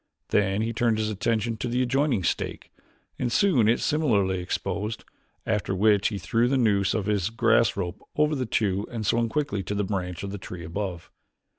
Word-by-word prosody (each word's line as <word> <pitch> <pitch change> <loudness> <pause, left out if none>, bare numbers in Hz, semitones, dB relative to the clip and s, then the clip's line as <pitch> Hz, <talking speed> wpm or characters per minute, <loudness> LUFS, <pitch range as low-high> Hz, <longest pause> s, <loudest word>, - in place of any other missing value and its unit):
Then 100 +1 +2
he 115 +1 -2
turned 115 -1 +1
his 110 0 -1
attention 110 +2 -1
to 115 - -3
an 120 +1 -1
adjoining 130 -4 +1
stake - - -2 0.5
and 125 -2 -1
soon 170 - +3
had 115 - +5
it - - -8
similarly 105 -12 +1
exposed, 105 +4 -3 0.4
after 105 -3 -1
which 105 0 +4
he 105 - -3
threw 115 +4 +1
the 135 +2 +2
noose 100 -5 +2
of 110 -3 -1
his 100 -2 0
grass 115 -1 +3
rope 90 -3 -4
over 150 +1 +2
the 130 -4 -2
two 100 -2 0
and 115 -3 -4
swung 115 +2 +2
quickly 140 -6 -1
to 105 - -4
the 105 - 0
branch 90 -3 -3
of 100 - -4
the 100 - -6
tree 90 -2 -8
above. 90 0 -5
110 Hz, 195 wpm, -26 LUFS, 100-120 Hz, 0.5 s, had